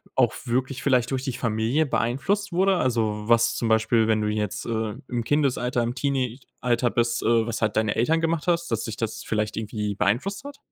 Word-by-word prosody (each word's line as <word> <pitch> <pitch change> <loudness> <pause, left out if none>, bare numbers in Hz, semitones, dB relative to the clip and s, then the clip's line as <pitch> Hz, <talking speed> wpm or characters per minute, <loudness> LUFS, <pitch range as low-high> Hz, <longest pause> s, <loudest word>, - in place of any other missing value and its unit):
auch 120 -3 +3
wirklich 130 +2 -1
vielleicht 125 -3 +2
durch 130 -1 -1
die 135 -2 -2
Familie 115 +6 0
beeinflusst 150 - -1
wurde? 190 +2 +3
Also, 110 -6 0
was 115 0 +4
zum 115 - -1
Beispiel, 110 0 +3
wenn 110 -1 +2
du 105 - 0
jetzt, 105 -1 -2
äh, 110 -2 -2
im 120 -2 -2
Kindesalter, 125 -3 +1
im 120 +1 -2
Teenie-Alter 125 -2 -1
bist, 120 0 0
äh, 115 0 +3
was 115 - -3
halt 110 -2 0
deine 110 -1 +1
Eltern 160 +8 +2
gemacht 165 0 -1
hast, 170 -1 +1
dass 115 -1 0
dich 110 -2 -5
das 115 -1 -3
vielleicht 105 -1 -2
irgendwie 105 -2 -3
beeinflusst 140 - 0
hat? 285 0 -9
120 Hz, 195 wpm, -25 LUFS, 110-135 Hz, -, was